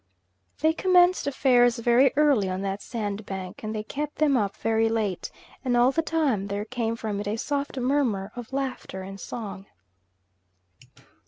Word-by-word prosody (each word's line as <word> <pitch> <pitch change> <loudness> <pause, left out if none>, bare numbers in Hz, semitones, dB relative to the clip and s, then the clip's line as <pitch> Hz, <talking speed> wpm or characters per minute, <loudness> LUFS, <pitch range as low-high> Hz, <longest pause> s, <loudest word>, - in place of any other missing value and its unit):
They 315 +1 +4
commenced 360 -1 +4
affairs 250 -3 +4
very 240 +3 +4
early 280 -10 +3
on 185 +1 -3
that 195 +1 -3
sandbank, 200 -4 -5
and 215 0 -4
they 215 - -3
kept 295 +6 -4
them 295 -2 +3
up 205 -5 0
very 225 0 +1
late; 215 -5 -1 0.3
and 250 -2 +1
all 245 +2 +5
the 325 - +1
time 295 -12 0
there 200 +1 -3
came 230 -1 -2
from 215 -3 -3
it 205 - -4
a 210 +2 -1
soft 280 +2 -2
murmur 245 -7 0
of 245 0 -8
laughter 265 -8 -4
and 195 +1 -8
song. 200 -4 -7
230 Hz, 160 wpm, -26 LUFS, 205-275 Hz, 0.3 s, all